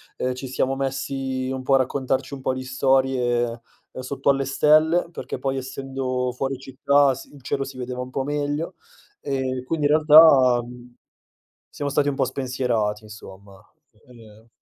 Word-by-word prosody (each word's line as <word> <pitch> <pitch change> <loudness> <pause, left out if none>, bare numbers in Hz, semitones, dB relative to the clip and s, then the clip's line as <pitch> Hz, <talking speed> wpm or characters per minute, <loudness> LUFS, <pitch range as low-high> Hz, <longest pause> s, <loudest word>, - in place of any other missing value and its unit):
ehm, 130 0 -2
ci 130 +1 -7
siamo 130 +1 -1
messi 135 -1 -3
un 130 -1 -4
po' 135 +1 0
a 135 - +6
raccontarci 130 +1 -1
un - - -10
po' 130 - -1
di 130 0 -5
storie, 130 -2 +1 0.4
ehm, - - -9
sotto 140 +2 -2
alle 135 0 +2
stelle 155 +5 +3
perché, - - -6
poi 135 -1 -2
essendo 130 -1 -3
fuori 135 +1 -3
città 135 +1 +2
si 135 - -11
il 135 - -15
cielo 135 +1 -2
si 135 -2 -10
vedeva 125 0 -5
un 125 0 -5
po' 135 - -2
meglio, 145 +2 -3 0.4
ehm, 130 -2 -3
quindi 150 0 0
in - - 0
realtà, 150 -5 +7
mhmm, 125 0 -13 0.7
siamo 145 -1 -4
stati 145 +1 +1
un 135 - -3
po' - - +1
spensierati, 120 -5 -2
insomma. 100 -2 -13 0.5
Uhm 110 -2 -17
130 Hz, 170 wpm, -23 LUFS, 125-140 Hz, 0.7 s, realtà